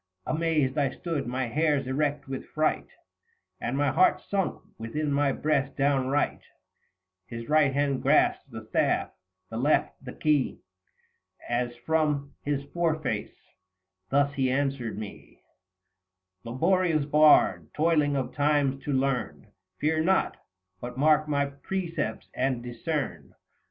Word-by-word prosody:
Amazed 155 -4 0
I 140 -2 +2
stood, 160 -1 -4
my 130 +1 -1
hairs 145 +3 +1
erect 145 +2 -1
with 135 -1 -6
fright, 155 0 0 0.7
105 - - -3
And 135 - -2
my 145 -1 +2
heart 185 +8 +4
sunk 195 -3 -2 0.2
within 145 +7 -2
my 140 0 +2
breast 140 -1 0
downright: 140 0 +1 0.9
His 115 0 -7
right 150 -2 +4
hand 140 -1 0
grasped - - +2
the - - -8
staff, - - +1 0.4
the 110 - -4
left 140 +3 +1
the 125 - -7
key, 150 -3 0 0.9
As 120 0 -1
from 145 +1 0
his 140 -1 -2
foreface 160 -4 -1 0.7
thus 140 +1 +2
he 135 -2 +1
answered 135 -4 -1
me: 105 -1 -10 0.5
" 95 0 -56
Laborious 160 +5 +1
Bard, 150 +1 +4
toiling 150 -2 +2
of 135 -2 -2
Times 145 -2 +1
to 145 - -1
learn; 130 -3 -1 0.3
Fear 155 +1 +1
not, 190 +3 +2 0.4
but 120 +3 -7
mark 155 +2 +4
my 140 -1 +1
precepts 165 +3 -4
and 130 -2 -1
discern. 135 +5 -4
140 Hz, 130 wpm, -27 LUFS, 130-155 Hz, 0.9 s, heart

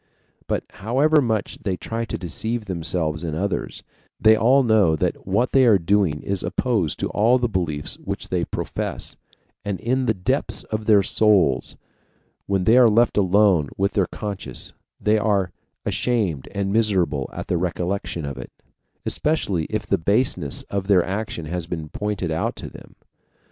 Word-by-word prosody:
But, - - -1
however 140 +9 +2
much 110 -5 -2
they 95 -3 -2
try 115 +4 -4
to - - -4
deceive 110 +6 -4
themselves 85 -4 -1
and 80 -2 -3
others, 100 +3 -3 0.4
they 110 0 +6
all 125 +5 +4
know 105 -9 +4
that 80 - -2
what 105 +6 +1
they 135 - +5
are 110 -4 +6
doing 90 -4 +1
is 100 -1 -1
opposed 110 - 0
to - - -1
all 115 +5 +4
the 125 -1 0
beliefs 85 -8 -2
which - - -5
they - - 0
profess, - - -4 0.5
and 100 -2 -3
in 130 +2 0
the 110 - +2
depths 90 -1 -1
of 110 0 -4
their 105 -2 +5
souls, 95 - +2 0.7
when 95 -2 +1
they 115 +6 +5
are 120 -2 +7
left 115 +2 +3
alone 95 -5 +3
with 100 +1 +1
their 95 -3 +1
conscience, 100 -2 -5 0.3
they 105 +1 +2
are 100 -4 +1 0.3
ashamed 100 - -1
and 100 -1 -2
miserable 95 - +1
at - - -6
the 90 - 0
recollection 90 -1 -2
of 70 -2 -6
it, - - -8 0.5
especially 100 - 0
if 105 +3 -3
the 100 - +1
baseness 100 - 0
of 100 -1 -4
their 95 -4 +4
action 95 -4 -4
has 85 +2 -4
been 80 -3 -5
pointed 105 -4 -3
out 80 - -1
to - - -8
them. - - -14
100 Hz, 165 wpm, -22 LUFS, 85-110 Hz, 0.7 s, are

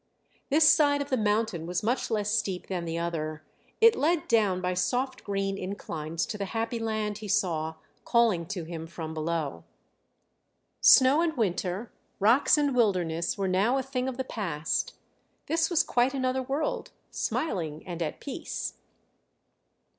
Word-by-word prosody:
This 305 +2 +5
side 285 -2 +5
of 285 0 -4
the - - +4
mountain 210 -6 0
was 180 +4 -2
much 245 +4 0
less 210 -2 0
steep 195 -5 -1
than 180 -3 -3
the 165 0 -3
other; 155 -2 -3 0.4
it 460 0 +7
led 325 +2 +1
down 210 -5 +3
by 180 0 -1
soft 250 +8 -1
green 195 -1 -2
inclines 165 -3 -4
to 210 - -6
the 200 - -1
happy 230 +1 -1
land 215 -2 -2
he 215 - -7
saw 170 -5 0 0.3
calling 225 -9 +2
to 185 -2 -4
him 165 0 -7
from 160 -1 -6
below. 155 - -3 1.2
Snow 270 +4 +7
and 325 -4 0
winter, 195 0 -1 0.3
rocks 230 +10 +5
and 285 -3 +1
wilderness 175 -8 +1
were 195 -1 0
now 200 +8 +2
a 265 - -1
thing 260 -1 -2
of 260 -2 -4
the 260 - -1
past; 170 -11 -2 0.5
this 325 +1 +1
was 345 -4 +3
quite 250 +3 +1
another 260 0 0
world, 300 - -2 0.2
smiling 160 - -2
and 175 -2 -6
at 160 - -3
peace. 275 - -5
210 Hz, 155 wpm, -28 LUFS, 170-260 Hz, 1.2 s, it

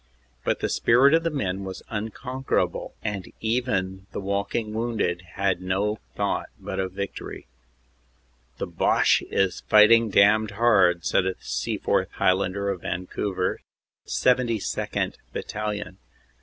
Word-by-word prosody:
But - - 0
the - - +1
spirit 130 +5 +4
of 165 - +5
the 165 - 0
men 100 - -2
was 95 -1 -7
unconquerable, 125 +5 -2
and 100 -4 -4
even 100 -5 -1
the - - -3
walking 100 +3 -2
wounded 110 -6 -1
had 95 -3 0
no 100 +4 -1 0.2
thought - - -1
but - - -5
of 95 -1 -2
victory. 100 0 -6 1.1
"The - - -2
Boche - - +3
is 95 -2 0
fighting 110 +2 +7
damned 105 +2 +4
hard," 95 -7 +4
said 95 - +2
a 95 - -1
Seaforth - - -1
Highlander 95 +1 +1
of 95 -3 -3
Van 90 +1 -3
couver, 95 -1 -2 0.5
72nd. 120 -4 0 0.2
Battalion. 105 -3 -4
100 Hz, 125 wpm, -25 LUFS, 95-115 Hz, 1.1 s, fighting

